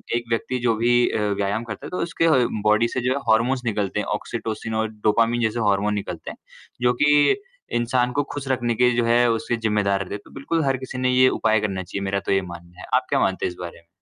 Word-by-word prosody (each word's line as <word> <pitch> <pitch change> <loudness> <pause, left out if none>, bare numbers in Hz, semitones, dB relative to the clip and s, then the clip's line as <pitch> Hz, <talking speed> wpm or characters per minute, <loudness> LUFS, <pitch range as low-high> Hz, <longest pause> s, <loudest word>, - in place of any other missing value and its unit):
एक 120 - -1
व्यक्ति 115 +2 -1
जो 120 -2 +1
भी 115 +2 +1 0.2
अ, - - -1 0.2
व्यायाम 100 +3 -1
करता 110 -3 -7
है - - -6
तो 180 - -4
उसके 165 0 -1
ह 125 -3 +3 0.2
बॉडी 110 +2 +3
से 130 - -3
जो 125 +1 0
है 140 - -2
हॉर्मोन्स 120 +4 +2
निकलते 105 -3 -1
हैं, - - -2
ऑक्सीटोसिन 110 +1 -4
और 110 0 0
डोपामाइन 115 +2 +1
जैसे 110 +1 0
हार्मोन 100 +1 +1
निकलते 100 -1 -5
हैं, - - -12 0.4
जो 125 0 +3
कि 145 - +5 0.4
इंसान 125 +1 +1
को - - +2
खुश 140 -2 -5
रखने 120 -3 0
के 125 +2 +4
जो 120 - +2
है 120 +1 +4
उसके 115 +1 -1
ज़िम्मेदार 100 -2 +1
रहते। 100 +2 -6
तो - - -17
बिल्कुल 160 +4 -2
हर 135 -1 +1
किसी 130 0 -7
ने 130 0 +1
ये 130 0 +5
उपाय 110 -1 +3
करना 95 -3 -2
चाहिए 100 +2 -5
मेरा 100 +1 0
तो - - -1
ये 95 0 +3
मानना 85 +1 -13
है। - - -8
आप - - +3
क्या - - +2
मानते 95 - 0
हैं - - -1
इस 90 - -13
बारे 85 -1 -7
में? 85 - -28
115 Hz, 250 wpm, -23 LUFS, 105-125 Hz, 0.4 s, कि